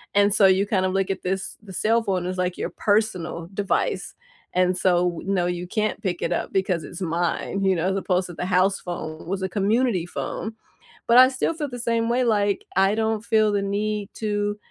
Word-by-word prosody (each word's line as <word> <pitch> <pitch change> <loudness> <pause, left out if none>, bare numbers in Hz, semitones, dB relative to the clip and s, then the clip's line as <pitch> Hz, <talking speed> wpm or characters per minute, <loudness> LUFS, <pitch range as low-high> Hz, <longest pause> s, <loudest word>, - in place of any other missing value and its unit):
And 205 0 +4
so, 205 -1 +5
you 190 +1 +4
kind 195 -3 +1
of 185 - -1
look 195 -1 0
at 190 - -5
this 190 +1 -3
the 200 -3 -11
cell 225 +5 +2
phone 190 -4 -1
as 185 +1 -3
like 180 -1 -1
your - - -3
personal 185 -6 -1
device, 200 0 -1 0.4
and 180 0 +2
so, 180 -1 +3
w 175 +1 -7
no, 190 -3 +1
you 175 0 -3
can't 215 +3 -1
pick 180 -3 -2
it - - -1
up - - -2
because 185 -4 0
it's 175 +5 -9
mine, 175 +3 -1
you 190 -1 +3
know, 170 +1 0
as 195 - 0
opposed 185 -1 0
to 175 - -9
the 180 - -4
house 190 +1 +2
phone 160 -3 -6
was 190 +1 -2
a 190 - -1
community 205 -1 +1
phone. 220 +5 -5 0.5
But 235 +1 +5
I 255 - +10
still 265 +5 -1
feel 305 -3 -3
the 245 -1 -7
same 230 -1 0
way, 250 +2 +2
like, 205 -4 +1
I 195 +2 +4
don't 220 -1 0
feel 215 -2 +3
the 205 -1 +1
need 205 +1 -2
to 205 -1 -1
195 Hz, 220 wpm, -24 LUFS, 180-215 Hz, 0.5 s, I